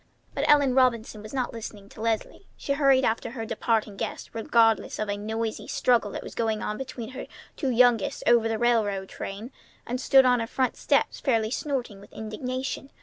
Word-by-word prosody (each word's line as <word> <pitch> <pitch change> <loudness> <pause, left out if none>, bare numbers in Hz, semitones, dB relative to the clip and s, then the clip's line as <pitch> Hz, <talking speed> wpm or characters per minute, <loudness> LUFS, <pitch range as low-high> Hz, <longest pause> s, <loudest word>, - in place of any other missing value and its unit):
But - - -1
Ellen 285 -3 +5
Robinson 235 -4 +2
was 215 - -10
not 260 -2 -2
listening 215 -3 -8
to - - -12
Leslie. 225 -1 -2
She 280 - -2
hurried 275 -2 +4
after 225 - 0
her 225 -1 -5
departing 220 -2 -1
guests - - -5
regardless 225 -1 +2
of 215 -1 -3
a - - -1
noisy 220 +2 -4
struggle 235 -4 +2
that - - -5
was - - -9
going 220 -2 -1
on 210 - -3
between 250 -3 -6
her 260 - -7 0.3
two 275 - -2
youngest 245 -3 +3
over 235 -1 +4
the 225 - -1
railway 215 -5 +1
train, 200 +5 -7 0.3
and 250 +2 -3
stood 265 0 +6
on 250 -1 +4
her 225 - -2
front 255 +2 0
steps, - - +1
fairly 225 -5 +1
snorting 250 -7 -3
with 205 - -16
indignation. 255 +5 -4
230 Hz, 190 wpm, -26 LUFS, 215-255 Hz, 0.3 s, stood